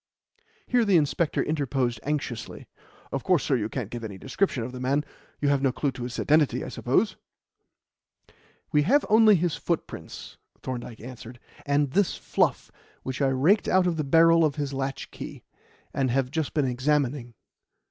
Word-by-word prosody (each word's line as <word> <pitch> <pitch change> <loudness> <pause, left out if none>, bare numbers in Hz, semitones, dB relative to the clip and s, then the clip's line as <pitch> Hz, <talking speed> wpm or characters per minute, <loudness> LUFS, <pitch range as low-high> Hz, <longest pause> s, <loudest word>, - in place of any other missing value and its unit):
Here 245 -1 +2
the 200 -5 +4
inspector 155 +1 +1
interposed 135 -6 -1
anxiously. 135 -6 -4 0.4
"Of 135 - -3
course, 180 -6 +2
sir, 135 - +1
you 110 -3 -1
can't 115 -5 -5
give 120 -1 -6
any 100 -3 -6
description 135 - -1
of 120 - -5
the 125 - -8
man. 140 +4 0 0.3
You 145 - +1
have 140 -1 +2
no 135 -2 +2
clue 140 +2 -1
to 125 - -9
his 120 0 -5
identity, 150 -1 +2
I - - -6
suppose?" - - 0 1.5
"We 150 - +4
have 270 - +3
only 220 -1 +7
his 170 -3 0
footprints," 165 +2 -5 0.3
Thorndyke 120 -3 -6
answered, 120 0 -10 0.3
"and 140 -1 +2
this 195 +3 +1
fluff - - 0 0.3
which 130 +2 -4
I 135 - +4
raked 145 +11 +3
out 185 0 +3
of 175 -2 0
the 155 - 0
barrel 165 +3 +5
of 150 -3 +1
his 145 -2 -3
latchkey, 135 0 -5 0.5
and 135 -2 0
have 130 +1 0
just 160 -1 -2
been 150 -3 +2
examining. 130 -1 0
140 Hz, 170 wpm, -26 LUFS, 125-160 Hz, 1.5 s, only